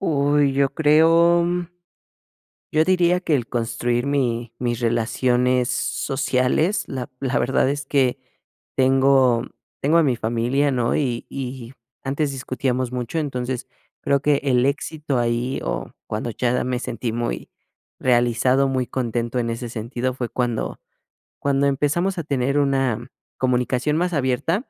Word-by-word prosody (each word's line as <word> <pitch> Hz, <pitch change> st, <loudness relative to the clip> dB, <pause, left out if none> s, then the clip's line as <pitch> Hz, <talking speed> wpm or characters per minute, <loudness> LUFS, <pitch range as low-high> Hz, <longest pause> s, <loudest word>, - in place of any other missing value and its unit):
Uy, 145 Hz, -4 st, +2 dB
yo 135 Hz, 0 st, +2 dB
creo 165 Hz, +3 st, +5 dB, 1.3 s
yo 155 Hz, -, +4 dB
diría 180 Hz, 0 st, +3 dB
que 165 Hz, -4 st, 0 dB
el 125 Hz, -5 st, 0 dB
construir 120 Hz, +1 st, -1 dB
mi 120 Hz, -5 st, -1 dB
mis 120 Hz, -1 st, -2 dB
relaciones 120 Hz, +2 st, +1 dB
sociales, 135 Hz, +8 st, 0 dB
la 130 Hz, -2 st, -5 dB
la 135 Hz, -1 st, 0 dB
verdad 130 Hz, +2 st, +2 dB
es 145 Hz, -1 st, -3 dB
que 135 Hz, -3 st, +1 dB, 0.6 s
tengo 130 Hz, -2 st, +4 dB, 0.4 s
tengo 155 Hz, +4 st, +3 dB
a -, -, +6 dB
mi 130 Hz, -5 st, +1 dB
familia, 120 Hz, +6 st, 0 dB
¿no? 120 Hz, -3 st, 0 dB
Y 125 Hz, -5 st, -1 dB
y 130 Hz, -2 st, -6 dB, 0.3 s
antes 140 Hz, +1 st, -1 dB
discutíamos 130 Hz, -1 st, -2 dB
mucho, 125 Hz, +5 st, -3 dB
entonces 130 Hz, -4 st, -3 dB, 0.4 s
creo 140 Hz, 0 st, +2 dB
que 145 Hz, +1 st, +3 dB
el 130 Hz, -2 st, +3 dB
éxito 145 Hz, -1 st, -2 dB
ahí, 120 Hz, +2 st, -1 dB
o -, -, -3 dB, 0.2 s
cuando 110 Hz, +2 st, -3 dB
ya 125 Hz, +2 st, 0 dB
me 125 Hz, -1 st, -1 dB
sentí 115 Hz, -1 st, -3 dB
muy 120 Hz, -, -3 dB, 0.5 s
realizado, 125 Hz, +2 st, +3 dB
muy 130 Hz, -1 st, 0 dB
contento 120 Hz, -1 st, -2 dB
en 120 Hz, -1 st, -1 dB
ese 115 Hz, +1 st, -4 dB
sentido, 120 Hz, +3 st, -3 dB
fue 125 Hz, -2 st, -3 dB
cuando 120 Hz, -2 st, -2 dB, 0.6 s
cuando 140 Hz, 0 st, +1 dB
empezamos 150 Hz, +7 st, 0 dB
a -, -, -3 dB
tener 140 Hz, -1 st, 0 dB
una 135 Hz, -4 st, 0 dB, 0.3 s
comunicación 130 Hz, +3 st, +1 dB
más 180 Hz, +1 st, 0 dB
abierta. 145 Hz, -, 0 dB
130 Hz, 135 wpm, -22 LUFS, 120-140 Hz, 1.3 s, a